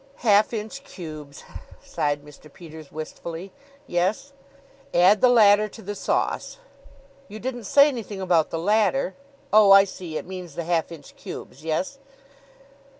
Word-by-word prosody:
'" 275 - -29
"Half 210 0 +5
inch 225 +5 -6
cubes," 155 - -10 0.4
sighed 145 -1 -2
Mr. 150 0 -15
Peters 160 -3 -12
wistfully. 165 +4 -7 0.3
"Yes?" 195 +10 -1 0.6
"'Add 190 +4 +5
the 255 - +6
latter 215 -3 +5
to 225 - -13
the 205 +2 -5
sauce.'" 205 - -2 0.7
"You 210 - -9
didn't 245 0 -5
say 280 +7 +6
anything 225 -8 -5
about 175 -4 +2
the - - -3
latter. 210 +5 +1 0.4
Oh, 210 -2 +7
I 195 0 +9
see; 180 -5 -7
it - - -6
means 180 -4 -8
the 170 - -3
half 170 -1 -1
inch 155 -4 -12
cubes. 135 +4 -10
Yes?" 170 - -2
190 Hz, 150 wpm, -24 LUFS, 160-215 Hz, 0.7 s, I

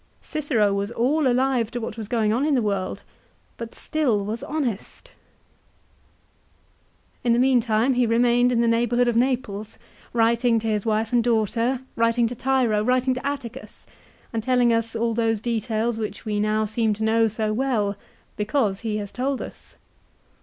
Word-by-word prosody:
Cicero 255 -10 0
was 200 +1 -1
all 265 +6 +1
alive 250 -2 +1
to 240 - -4
what 225 -2 -5
was 220 -3 -6
going 220 -2 +1
on 245 +4 +1
in 300 -1 +2
the 250 - +2
world, 195 -3 -2 0.5
but 230 -1 -8
still 245 -10 0
was 220 +3 -4
honest! 265 -10 -4 2.1
In 235 - +3
the - - +2
meantime 245 -1 +3
he 245 -1 +2
re 230 +1 +2
mained 245 +1 +3
in 235 -1 +2
the 235 - +2
neighbourhood 240 +1 +2
of 240 - +1
Naples, 235 -4 -1 0.3
writing 235 +1 +2
to 225 - -3
his 215 0 -1
wife 220 +1 0
and 240 -1 +4
daughter, 235 +2 +1
writing 230 +1 +2
to 230 - -2
Tiro, 245 -4 +1
writing 255 +2 +2
to 255 - -5
Atticus, 250 -7 -6 0.5
and 225 - -1
telling 245 0 +3
us 230 0 -1
all 230 0 0
those 225 -1 +1
details 225 0 -1
which 210 0 -5
we 210 -1 -1
now 215 +1 +1
seem 220 0 0
to 220 - -4
know 225 +1 +3
so 215 0 -2
well, 220 -5 0 0.4
because 210 -2 0
he 220 -2 -2
has 205 -2 -5
told 265 +2 -2
us. - - -10
230 Hz, 170 wpm, -24 LUFS, 215-245 Hz, 2.1 s, and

